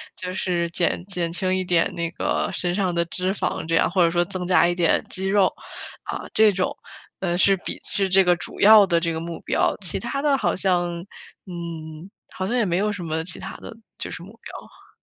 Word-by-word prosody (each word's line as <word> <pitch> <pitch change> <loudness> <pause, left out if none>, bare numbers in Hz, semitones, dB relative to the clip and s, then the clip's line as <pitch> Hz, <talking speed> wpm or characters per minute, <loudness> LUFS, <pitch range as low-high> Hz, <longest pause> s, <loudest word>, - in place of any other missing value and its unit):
就 180 0 -5
是 175 -2 -1
减 175 +1 -1
减 180 -4 -3
轻 185 +2 0
一 185 - 0
点 175 -2 +1
那 170 -1 -2
个 - - -1
身 175 -1 -1
上 185 -2 0
的 170 0 +1
脂 185 +2 -2
肪 195 - -2
这 165 - +1
样， - - +3
或 180 0 +3
者 170 - +4
说 175 0 +2
增 180 0 -5
加 180 -1 +5
一 175 - +1
点 175 -2 +2
肌 190 +1 -2
肉 195 -1 +3 0.5
啊， - - -5
这 215 -1 +6
种， 185 -1 -1 0.4
呃， 175 -2 -1
是 195 +2 +5
比 - - -6
是 195 -1 0
这 190 +1 +5
个 180 -1 +4
主 170 - -8
要 210 0 +8
的 170 -3 +2
这 165 0 -1
个 160 - -3
目 165 0 -6
标。 - - +1
其 185 - -3
它 240 +4 -3
的 285 -1 +3
好 - - 0
像， 175 -2 0 0.5
嗯， 170 -2 -7 0.2
好 185 - -3
像 240 - -1
也 235 - +2
没 175 -2 0
有 210 +2 +1
什 200 -3 -5
么 160 -1 -2
其 170 0 -7
它 - - -7
的 - - -10 0.2
就 - - -6
是 175 - -7
目 195 - -12
标。 - - -12
180 Hz, 245 characters per minute, -23 LUFS, 170-195 Hz, 0.5 s, 要